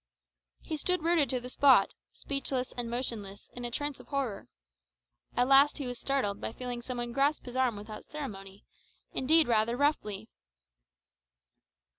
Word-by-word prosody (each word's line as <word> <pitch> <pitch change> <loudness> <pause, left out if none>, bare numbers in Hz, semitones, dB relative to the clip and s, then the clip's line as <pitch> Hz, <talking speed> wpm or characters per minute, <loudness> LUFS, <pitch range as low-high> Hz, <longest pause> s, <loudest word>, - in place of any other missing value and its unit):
He 315 - -4
stood 360 +2 0
rooted 330 -4 +3
to 255 - 0
the 245 - -8
spot, 255 -5 +5 0.2
speechless 270 -2 -3
and 240 -1 -3
motionless, 225 -5 -3
in 245 - -7
a 240 - -2
trance 290 +3 -3
of - - -14
horror. 265 -8 -3 0.9
At 245 - +4
last 275 +2 +6
he 285 - -4
was 245 -1 -5
startled 235 -8 -1
by - - -3
feeling 245 -1 -5
some 250 +1 -5
one 240 0 -3
grasp 275 +4 +1
his 250 -1 -8
arm 255 -3 +2
without 210 +1 -9
ceremony, 195 -9 -8 0.5
indeed 315 +5 +4
rather 230 +1 +2
roughly. 220 -8 0
250 Hz, 155 wpm, -30 LUFS, 230-280 Hz, 0.9 s, last